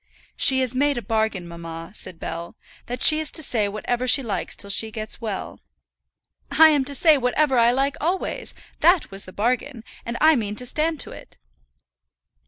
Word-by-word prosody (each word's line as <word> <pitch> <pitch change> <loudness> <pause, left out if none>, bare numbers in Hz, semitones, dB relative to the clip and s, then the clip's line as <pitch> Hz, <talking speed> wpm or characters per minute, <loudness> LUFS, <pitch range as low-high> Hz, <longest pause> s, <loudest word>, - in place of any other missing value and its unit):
"She 265 -1 +4
has 255 -1 -1
made 285 +1 +1
a 240 - -4
bargain, 220 -4 -1
mamma," 165 0 -9
said 175 -5 -8
Bell, 170 +1 -6 0.3
"that 245 +1 -3
she 310 0 +6
is 315 - -3
to 315 - +1
say 220 -7 0
whatever 240 +5 -3
she 270 +2 +5
likes 210 -5 -3
till 200 - -2
she 220 +3 +3
gets 215 +1 -6
well." 215 -4 -5 0.9
"I 315 +3 +6
am 290 -3 +2
to 280 +1 -1
say 310 -1 +4
whatever 260 +1 +1
I 235 0 +5
like 270 +3 0
always; 355 +4 -3 0.2
that 350 - +3
was 195 0 -1
the 185 - -11
bargain, 240 +3 -2 0.2
and 235 0 -5
I 315 0 +5
mean 210 -4 -3
to 250 - -2
stand 310 +4 -1
to - - -5
it." - - -13
245 Hz, 190 wpm, -22 LUFS, 210-285 Hz, 0.9 s, she